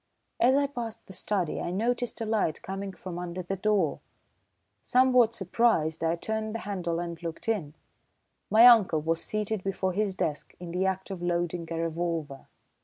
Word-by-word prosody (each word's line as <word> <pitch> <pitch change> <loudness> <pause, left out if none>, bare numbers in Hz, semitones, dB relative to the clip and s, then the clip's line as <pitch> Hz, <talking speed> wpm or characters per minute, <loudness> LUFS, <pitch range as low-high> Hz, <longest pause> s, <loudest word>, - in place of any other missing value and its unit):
As 260 +3 +5
I 285 - +3
passed 240 -5 -6
the 190 - -11
study 185 -2 -1
I - - -3
noticed 235 +7 -1
a - - -1
light 215 -8 0
coming 195 +1 -5
from 180 -2 -7
under 180 +1 -5
the 195 +3 -3
door. 195 -5 +1 0.8
Somewhat 250 -2 +4
surprised, 180 -6 +1
I 165 +1 +2
turned 220 +4 -3
the - - -2
handle 175 -4 -2
and 170 -1 -5
looked 165 +3 -6
in. 175 -10 -1 0.7
My 225 +2 +7
uncle 215 -10 +7
was 165 +1 -1
seated 215 -2 -2
before 190 -1 -1
his 200 -1 0
desk 150 -5 -3
in 175 -1 -7
the 185 +2 0
act 190 +1 -3
of 185 -2 -6
loading 175 -1 -1
a 165 - -3
revolver. 165 -3 -3
190 Hz, 175 wpm, -28 LUFS, 170-220 Hz, 0.8 s, My